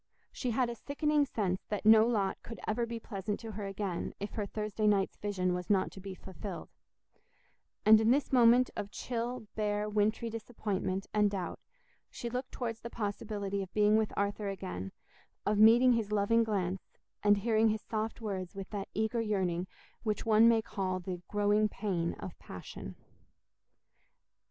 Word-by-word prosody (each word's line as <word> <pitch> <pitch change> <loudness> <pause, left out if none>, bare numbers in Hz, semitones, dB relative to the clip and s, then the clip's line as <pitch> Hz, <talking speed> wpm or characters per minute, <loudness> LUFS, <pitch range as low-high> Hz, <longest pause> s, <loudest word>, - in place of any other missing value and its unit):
She 250 - -3
had 245 +2 +2
a 235 - -3
sickening 290 +3 0
sense 190 -6 -1
that 210 0 -3
no 220 +1 +8
lot 200 -5 0
could 230 - -9
ever 235 +2 0
be 230 0 -4
pleasant 205 -2 -4
to 225 -1 -6
her 205 -1 -5
again 195 -3 -3
if 205 - -4
her 210 -2 -3
Thursday 215 +1 -1
night's 200 -2 +2
vision 185 -3 -1
was 180 0 -4
not 195 -2 +2
to - - -10
be 190 0 -7
fulfilled; 190 +1 -8 1.2
and 215 +1 +8
in 220 - +3
this 275 +2 +2
moment 245 0 +6
of 205 -1 -4
chill, 240 +1 -4
bare, 210 -1 -1
wintry 215 +2 +1
disappointment 210 -4 -3
and 210 -1 +4
doubt, 195 -3 -4 0.5
she 235 - -6
looked 250 +1 -3
towards 230 -3 -4
the 235 - -6
possibility 205 -2 -3
of 190 -1 -6
being 210 0 +5
with 220 -1 +2
Arthur 200 +1 -1
again, 95 - -5 0.5
of 210 0 +2
meeting 235 +4 +7
his 220 -3 -1
loving 210 +3 +3
glance, 195 -4 -3 0.2
and 205 0 +5
hearing 220 +1 +3
his 215 0 0
soft 220 +1 -3
words 190 -4 -4
with 195 -1 -7
that 205 -2 -4
eager 220 +2 0
yearning 185 -5 0 0.3
which 215 -2 -2
one 225 +1 +6
may 225 -1 +3
call 190 -4 -2
the 180 -1 -5
"growing 205 +1 +2
pain" 180 -6 -1
of 185 - -8
passion. 90 - -9
210 Hz, 170 wpm, -32 LUFS, 195-225 Hz, 1.2 s, no